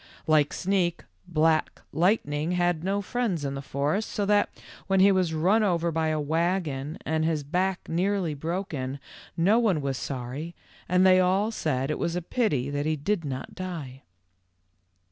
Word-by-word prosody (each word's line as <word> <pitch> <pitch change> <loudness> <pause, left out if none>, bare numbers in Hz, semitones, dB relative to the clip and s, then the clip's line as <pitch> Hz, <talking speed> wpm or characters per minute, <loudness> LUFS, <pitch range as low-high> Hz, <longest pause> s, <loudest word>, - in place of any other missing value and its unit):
Like 150 -2 +3
Sneak, 180 -2 0 0.2
Black 160 -1 +1
Lightning 160 -2 +1
had 175 -2 +1
no 200 +2 0
friends 195 -9 -1
in 135 - -2
the 135 - -4
forest, 145 +10 -1
so 205 - -1
that 205 0 +3 0.4
when 195 0 +2
he 195 +1 +7
was 185 -3 +2
run 190 +8 +3
over 170 -5 +1
by 160 0 0
a 155 - +1
w 150 -1 -3
T 160 +2 +1
agon 155 -5 -2
and 160 0 0
his 160 -2 0
back 180 +5 -1
nearly 180 -1 0
broken, 145 -4 -4 0.4
no 195 +7 +4
one 205 -9 +2
was 135 -2 -2
sorry 135 +6 -5 0.3
and 180 +1 +4
they 185 0 +6
all 190 +4 +2
said 140 - -1
it - - -3
was 170 - -1
a 180 - -1
pity 150 - 0
that 145 +1 -1
he 155 - +1
did 170 +5 -1
not 135 -3 -5
die. 155 -8 -6
165 Hz, 175 wpm, -27 LUFS, 145-190 Hz, 0.4 s, he